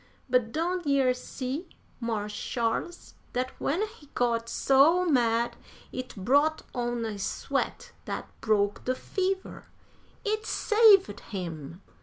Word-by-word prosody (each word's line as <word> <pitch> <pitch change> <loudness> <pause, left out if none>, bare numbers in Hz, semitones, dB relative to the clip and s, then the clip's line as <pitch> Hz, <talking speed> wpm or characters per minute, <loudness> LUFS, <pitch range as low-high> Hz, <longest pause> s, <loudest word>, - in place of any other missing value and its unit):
But 250 -3 +2
don' 350 +5 0
yer 270 -3 +4
see, 260 +5 -5 0.3
Marsh 215 -3 -2
Sharles, 235 +11 -2 0.2
dat 255 +1 -1
when 350 +9 +1
he 420 -10 -15
got 230 -1 +1
so 305 +7 +4
mad 235 -6 +2 0.4
it 255 0 -6
brought 285 +10 +2
on 240 -2 -1
a 210 -2 -4
sweat - - -2
dat - - -4
broke 205 -2 +1
de 255 - +1
fever! 380 +5 -3 0.6
It 430 +1 -1
saved 425 -3 +5
him! 170 -3 -7
255 Hz, 120 wpm, -28 LUFS, 230-330 Hz, 0.6 s, saved